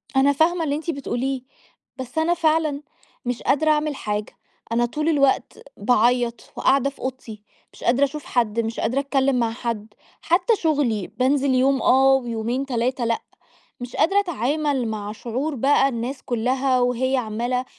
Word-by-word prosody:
أنا 275 Hz, +1 st, +4 dB
فاهمة 330 Hz, +3 st, +2 dB
اللي 285 Hz, -2 st, 0 dB
أنتِ 315 Hz, +3 st, -5 dB
بتقوليه، 270 Hz, -2 st, -3 dB, 0.6 s
بس 260 Hz, +3 st, -8 dB
أنا 325 Hz, +2 st, +3 dB
فعلًا، 310 Hz, -3 st, +1 dB, 0.4 s
مش 245 Hz, -1 st, -2 dB
قادرة 310 Hz, +3 st, +3 dB
أعمل 300 Hz, -1 st, 0 dB
حاجة 210 Hz, -2 st, -4 dB, 0.3 s
أنا 240 Hz, +1 st, +2 dB
طول 305 Hz, +6 st, -2 dB
الوقت 275 Hz, -3 st, +1 dB, 0.2 s
باعيط 240 Hz, +2 st, +1 dB
وقَاعدة 275 Hz, +1 st, +2 dB
في 280 Hz, -, -18 dB
أوضتي. 230 Hz, -5 st, -6 dB, 0.3 s
مش -, -, -13 dB
قادرة 255 Hz, +4 st, +3 dB
أَشُوف 290 Hz, +2 st, -2 dB
حد، 230 Hz, -2 st, 0 dB
مش 225 Hz, 0 st, -2 dB
قادرة 265 Hz, +3 st, 0 dB
أتكلّم 275 Hz, -1 st, +1 dB
مع 230 Hz, -1 st, +1 dB
حَدّ. 230 Hz, -3 st, -4 dB, 0.3 s
حتّى 360 Hz, +7 st, +2 dB
شُغلي، 280 Hz, -, 0 dB
بانزل 260 Hz, +4 st, +1 dB
يوم 270 Hz, +1 st, +3 dB
آه 270 Hz, +1 st, +5 dB
ويومين 240 Hz, +1 st, -1 dB
3 245 Hz, -1 st, -1 dB
لأ. 230 Hz, 0 st, 0 dB, 0.6 s
مش 245 Hz, 0 st, -7 dB
قادرة 390 Hz, +4 st, +3 dB
أتعامل 290 Hz, -, -1 dB
مع 210 Hz, -1 st, -4 dB
شعور 255 Hz, +7 st, -3 dB
بقى 275 Hz, +2 st, +3 dB
الناس 250 Hz, +2 st, -4 dB
كُلّها 255 Hz, +2 st, +1 dB
وهيّ 255 Hz, +2 st, +1 dB
عمّالة 245 Hz, +2 st, -2 dB
260 Hz, 155 wpm, -23 LUFS, 235-285 Hz, 0.6 s, آه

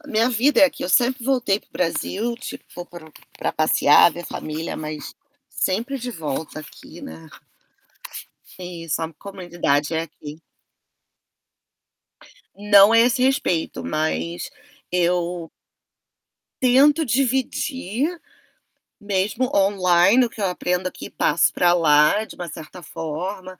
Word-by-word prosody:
A 295 Hz, -, -16 dB
minha 230 Hz, -1 st, +2 dB
vida 255 Hz, +5 st, +2 dB
é -, -, +9 dB
aqui, 275 Hz, -, -2 dB
eu -, -, -3 dB
sempre 245 Hz, +3 st, +2 dB
voltei 245 Hz, -7 st, +1 dB
para -, -, -31 dB
o -, -, -46 dB
Brasil 195 Hz, +6 st, -2 dB
tipo 260 Hz, -, -8 dB
vou 175 Hz, -, -7 dB
para 160 Hz, -3 st, -8 dB
passear, 155 Hz, +1 st, +5 dB
ver 175 Hz, 0 st, -8 dB
família 155 Hz, +2 st, -5 dB
mas, 155 Hz, -1 st, -7 dB, 0.3 s
sempre 255 Hz, +1 st, -2 dB
de 245 Hz, 0 st, -5 dB
volta 155 Hz, -, -5 dB
aqui, 150 Hz, -, -13 dB
né. 80 Hz, 0 st, -11 dB, 1.3 s
É 180 Hz, -, -7 dB
isso, 165 Hz, -3 st, -4 dB
a 160 Hz, 0 st, -4 dB
comunidade 175 Hz, -6 st, -2 dB
é 160 Hz, -, 0 dB
aqui. 155 Hz, -1 st, -10 dB, 2.1 s
Não 205 Hz, +1 st, +6 dB
a 230 Hz, -, +6 dB
esse 245 Hz, +2 st, +3 dB
respeito 255 Hz, -11 st, 0 dB
mas, 85 Hz, -, -2 dB, 0.4 s
eu 175 Hz, -1 st, 0 dB, 1.1 s
tento 280 Hz, +5 st, +4 dB
dividir, 265 Hz, -, -1 dB, 0.8 s
mesmo 205 Hz, +4 st, -1 dB
online 195 Hz, +3 st, +4 dB
o -, -, -5 dB
que 225 Hz, -, -14 dB
eu 200 Hz, -, 0 dB
aprendo 180 Hz, 0 st, -1 dB
aqui -, -, -8 dB
passo -, -, +2 dB
para 175 Hz, -1 st, +3 dB
lá 155 Hz, +4 st, +4 dB
de -, -, -12 dB
uma 175 Hz, -, -6 dB
certa 160 Hz, +3 st, -10 dB
forma, 185 Hz, +5 st, -6 dB
185 Hz, 130 wpm, -22 LUFS, 165-235 Hz, 2.1 s, é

